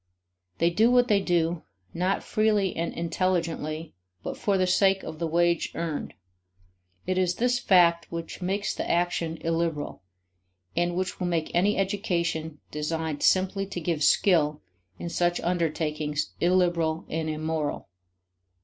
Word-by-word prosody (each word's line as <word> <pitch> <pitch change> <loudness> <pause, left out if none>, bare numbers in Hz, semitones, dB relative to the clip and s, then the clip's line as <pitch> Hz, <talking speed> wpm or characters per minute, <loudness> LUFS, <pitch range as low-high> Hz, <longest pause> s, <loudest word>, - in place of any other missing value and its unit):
They 170 +1 +2
do 220 +7 +4
what 245 0 +4
they 205 -2 +4
do, 170 -2 +1 0.3
not 185 +3 0
freely 210 -3 +1
and 170 +1 -2
intelligently, 165 -2 -2 0.3
but - - -4
for 200 -2 0
the 185 - +2
sake 190 +1 +3
of 155 -1 -7
the 170 - -1
wage 170 +1 +1
earned. 165 -3 -4 0.9
It 185 0 0
is 180 -1 +1
this 245 +1 +1
fact 170 -6 +4
which 165 +2 -6
makes 195 +3 -1
the - - -4
action 170 -1 0
illiberal, 165 -6 -2 0.7
and 175 0 +1
which 185 0 -2
will 180 - -1
make 165 -2 -1
any 195 +5 +2
education 170 -6 -1
designed 155 0 -3
simply 195 +1 +2
to 185 - -5
give 165 -2 -1
skill 150 -4 +3 0.3
in - - -5
such 175 0 +1
undertakings 155 -3 -1
illiberal 175 -2 +2
and 160 0 -2
immoral. 155 -1 -2
170 Hz, 140 wpm, -27 LUFS, 160-185 Hz, 0.9 s, do